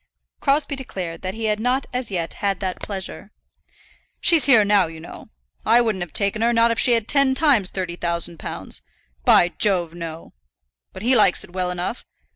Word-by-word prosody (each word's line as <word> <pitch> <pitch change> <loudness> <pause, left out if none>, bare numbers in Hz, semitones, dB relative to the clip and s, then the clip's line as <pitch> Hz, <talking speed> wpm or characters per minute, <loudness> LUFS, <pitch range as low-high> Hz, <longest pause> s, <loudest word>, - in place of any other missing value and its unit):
Crosbie 285 0 +1
declared 185 -11 -6
that 185 +2 -5
he 225 0 -4
had 210 -1 0
not 250 +4 0
as 250 -2 -2
yet 170 -4 -3
had 200 -1 0
that 185 -2 -4
pleasure. 195 0 -6 0.9
"She's 335 -4 +5
here 235 -7 +6
now, 200 -3 +3
you 160 0 -10
know. 160 - -11 0.3
I 235 - +4
wouldn't 220 -6 0
have 175 -3 -5
taken 200 +4 0
her, 235 +1 +3
not 230 0 +3
if 230 - -1
she'd 245 - +4
had 230 -2 0
ten 275 -2 +3
times 265 - +2
thirty 180 -2 -5
thousand 170 -1 -3
pounds. - - -6 0.4
By 175 - +5
Jove, 180 -6 +1
no. 165 -1 -8 0.6
But 190 - -10
he 255 +3 +3
likes 210 -5 +4
it 175 - -15
well 185 -1 -1
enough. 180 +6 -4
205 Hz, 190 wpm, -22 LUFS, 180-240 Hz, 0.9 s, here